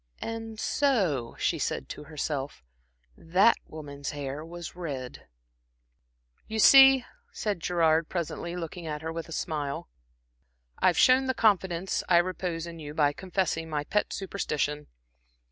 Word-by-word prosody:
"And 225 -1 -6
so," 185 - +1
she - - 0
said 65 - -2
to - - -8
herself, 145 - -4 0.5
"that 190 +8 +3
woman's 145 -2 -7
hair 145 +1 -5
was 170 +1 -8
red." 140 -8 -6 1.2
"You 220 - -4
see," 270 +2 +8 0.3
said 205 -4 -2
Gerard, 165 -2 +2
presently, 170 0 -4
looking 170 0 -6
at 150 0 -4
her 160 0 -4
with 165 0 -6
a - - -10
smile, 145 - -3 0.9
"I've 180 - +3
shown 260 +1 +5
the 260 - 0
confidence 190 -4 +1
I 175 - +6
repose 175 -1 -1
in 170 -1 -9
you 150 -1 -8
by 145 -2 +3
confessing 180 -2 -2
my 150 -2 -1
pet 210 +7 0
superstition. 150 -6 -2
165 Hz, 135 wpm, -28 LUFS, 150-190 Hz, 1.2 s, see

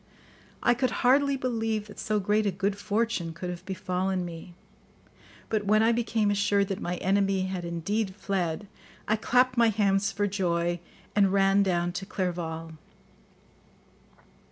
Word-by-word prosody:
I 240 - +5
could 250 +1 0 0.2
hardly 280 +2 +4
believe 225 -4 -1
that 210 - -12
so 215 -1 0
great 210 +2 +1
a - - +2
good 195 +2 -1
fortune 205 -4 -1
could 180 +2 -5
have 175 0 -8
befallen 185 -1 -1
me, 170 +1 -9 0.9
but 210 -2 -1
when 215 +1 +4
I 230 - +4
became 225 -3 +1
assured 205 -1 +2
that 195 - -3
my 175 - -2
enemy 195 +1 +1
had 185 -1 -3
indeed 190 +4 -2
fled, 195 -2 -2 0.4
I 215 - +3
clapped 250 +3 +2
my 235 -1 +5
hands 200 -2 +2
for 205 +1 0
joy 175 -3 0 0.4
and 200 -2 +4
ran 195 0 +4
down 175 -3 +1
to 195 +2 -5
Clerval. 165 -4 -4
200 Hz, 150 wpm, -27 LUFS, 180-215 Hz, 0.9 s, I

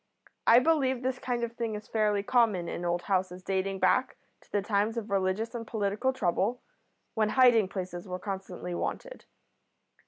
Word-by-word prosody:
I 230 - +8
believe 265 -3 +2
this 260 0 -1
kind 245 -2 -2
of 235 - -2
thing 230 -2 -3
is 210 0 -8
fairly 210 -2 +1
common 210 -7 +2
in 175 - -4
old 175 0 0
houses 185 -2 -1
dating 195 0 -1
back 255 +6 +2 0.2
to - - -26
the 205 -1 0
times 210 +2 0
of 225 -2 -4
religious 195 +4 0
and 230 -2 -5
political 215 +4 0
trouble, 220 0 0 0.5
when 215 -1 +1
hiding 240 -4 +5
places 185 -1 -6
were 180 0 -4
constantly 190 -2 -5
wanted. - - -4
210 Hz, 165 wpm, -29 LUFS, 190-240 Hz, 0.5 s, I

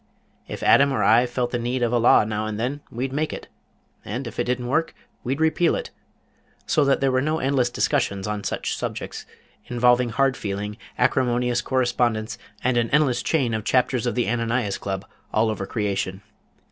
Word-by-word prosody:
If - - -6
Adam 140 0 +5
or 135 - 0
I 120 +3 +5
felt 120 0 -2
the 120 - -1
need 120 +1 -1
of 120 0 +1
a 120 - +3
law 115 - +6
now 105 0 -2
and 110 0 -4
then, 135 +5 -2
we'd 130 +3 -4
make 155 +2 -1
it, - - -7 0.6
and 120 +7 -4
if 115 - -7
it - - +1
didn't 125 0 -1
work, 160 +6 0 0.3
we'd 135 +3 -2
repeal 160 +1 +2
it, - - -5 0.7
so 150 - +2
that 135 0 +2
there 135 -1 +3
were 130 0 +2
no 155 +3 0
endless 130 -4 +1
discussions 100 -4 0
on 105 -1 -3
such - - -2
subjects, - - -5 0.4
involving 125 0 +3
hard 135 +3 +2
feeling, 105 0 -4 0.2
acrimonious 125 -1 +1
correspondence, 120 -4 0 0.2
and 125 -1 +2
an 115 -1 +1
endless 140 -5 +2
chain 135 -8 0
of 110 -1 -2
Chapters 125 0 +1
of 120 - -1
the 120 - 0
Ananias 115 -2 -1
Club 95 0 -4 0.3
all 110 0 +2
over 95 -2 -4
creation. 100 -2 -2
120 Hz, 185 wpm, -23 LUFS, 110-130 Hz, 0.7 s, law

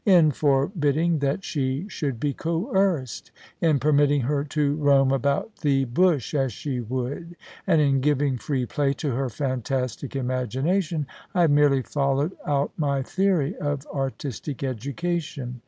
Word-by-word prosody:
In 175 -7 +5
forbidding 150 +3 +1
that 140 +7 -1
she 140 0 -2
should 145 - -3
be 145 +2 0
coerced; 170 - -1 0.3
in 160 -3 +4
permitting 145 -1 +3
her 140 +3 0
to 145 -1 0
roam 140 -3 +4
about 140 - 0
the 135 -3 +1
bush 145 0 +1
as 135 -3 +1
she 130 +4 -4
would, 130 +8 -4 0.3
and 165 -4 +4
in 140 -3 +3
giving 140 -2 +1
free 130 -2 -1
play 140 +3 0
to 140 +2 -3
her 130 +2 -1
fantastic 130 0 -3
imagination, 135 +6 -1 0.3
I 180 - +4
have 165 -3 +4
merely 145 -2 +4
followed 140 +3 0 0.2
out 140 -1 +1
my 140 -3 0
theory 185 -1 +1
of 145 -1 -2
artistic 135 0 -4
education. 140 0 -3
140 Hz, 140 wpm, -25 LUFS, 135-155 Hz, 0.3 s, In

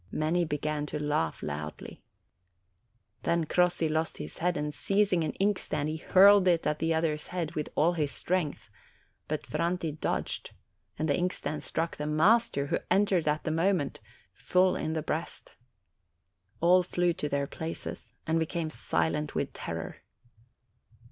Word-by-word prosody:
Many 165 +3 +1
began 150 0 -2
to 150 - -3
laugh 145 - -1
loudly. 75 +1 -6 1.2
Then 170 -1 +1
Crossi 180 0 +2
lost 160 +1 -1
his - - -8
head, 180 +1 +1
and 150 0 -2
seizing 195 0 +2
an 155 - -2
inkstand, 185 -7 0
he 155 - -3
hurled 195 +3 +6
it 170 -2 +3
at 150 - 0
the 165 +1 0
other's 160 -2 0
head 170 -3 -3
with 150 - -3
all 165 +4 +3
his 150 -4 0
strength; 155 - -2 0.6
but - - -3
Franti 170 -1 -1
dodged, 155 - -3 0.4
and 155 - -1
the 145 - +2
inkstand 175 -3 -2
struck 165 +1 -2
the 150 - -3
master, 165 0 +3
who - - 0
entered 190 -3 +3
at 150 +1 +1
the 155 - -1
moment, 165 -3 +1 0.3
full 180 - +2
in 155 0 -2
the 160 -1 -2
breast. - - -4 1.1
All 180 +2 +6
flew 175 -1 +1
to 150 -2 -3
their 140 0 0
places, 160 +3 -6
and 160 +1 +1
became 160 0 -2
silent 150 -1 -1
with - - -1
terror. - - -5
160 Hz, 150 wpm, -29 LUFS, 150-180 Hz, 1.2 s, hurled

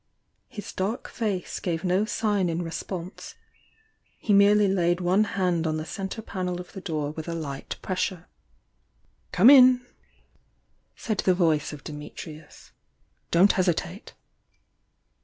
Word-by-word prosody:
His 225 -5 -8
dark 200 +6 -3
face 205 -6 -3
gave 170 -3 -3
no 185 +3 +2
sign 205 -5 0
in 165 +1 -2
response; 170 +2 -6 0.8
he 210 - 0
merely 205 +1 +5
laid 175 -2 +1
one 185 +4 +2
hand 180 -5 0
on 155 0 -1
the 155 - -4
centre 195 +6 -5
panel 180 -3 -4
of 180 - -9
the 190 - -7
door 155 -6 -3
with 160 +1 -7
a 170 - -3
light 140 -4 -5
pressure. 185 -2 -2 1.0
"Come 255 - +7
in!" 255 -2 +7 1.1
said 215 -3 -3
the 185 - +3
voice 160 -5 +1
of 150 -2 -10
Dimitrius. 150 +1 -10 0.6
"Don't 185 +4 +5
hesitate!" 180 +1 -2
180 Hz, 130 wpm, -26 LUFS, 165-200 Hz, 1.1 s, Come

